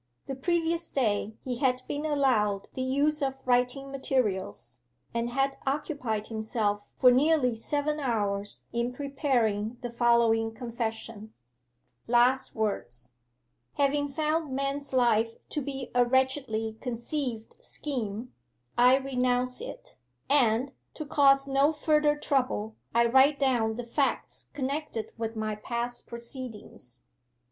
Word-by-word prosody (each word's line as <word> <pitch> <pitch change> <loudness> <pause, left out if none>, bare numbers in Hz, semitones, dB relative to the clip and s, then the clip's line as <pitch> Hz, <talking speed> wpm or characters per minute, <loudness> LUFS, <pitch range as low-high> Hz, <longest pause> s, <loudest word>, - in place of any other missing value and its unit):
The 270 - -4
previous 335 +4 0
day 215 -4 0
he 250 -2 -2
had 255 -2 +1
been 295 +2 -2
allowed 230 -9 +1
the 260 - -4
use 285 +4 +1
of 270 -1 -1
writing 250 +2 +1
materials, 210 - -2 0.3
and 235 0 -1
had 270 +2 0
occupied 265 -7 -1
himself 215 -2 -2
for 250 - +7
nearly 270 -1 +3
seven 290 +6 -1
hours 205 -6 -1
in 235 +1 -1
preparing 245 -6 0
the 245 -1 -4
following 230 -2 +3
confession: 225 -2 -5 0.7
'LAST 245 +3 +3
WORDS. 120 - -3 0.6
'Having 285 +1 +1
found 310 +1 -1
man's 275 +1 -2
life 230 -3 +3 0.2
to 300 - -2
be 270 -2 -5
a 245 0 +5
wretchedly 245 -4 0
conceived 240 -1 -4
scheme, 240 -4 -4 0.5
I 250 +2 +7
renounce 250 -2 0
it, - - -9 0.3
and, 260 -1 +3 0.2
to 310 - -5
cause 275 -1 +4
no 275 +2 +3
further 300 -1 +2
trouble, 255 -7 0 0.2
I 235 0 +5
write 265 +4 +5
down 240 -5 +1
the 245 +1 -5
facts 270 +4 -1
connected 280 -4 -3
with 225 0 -3
my 215 -1 -2
past 235 +2 -4
proceedings. 235 - -7
250 Hz, 120 wpm, -28 LUFS, 225-275 Hz, 0.7 s, for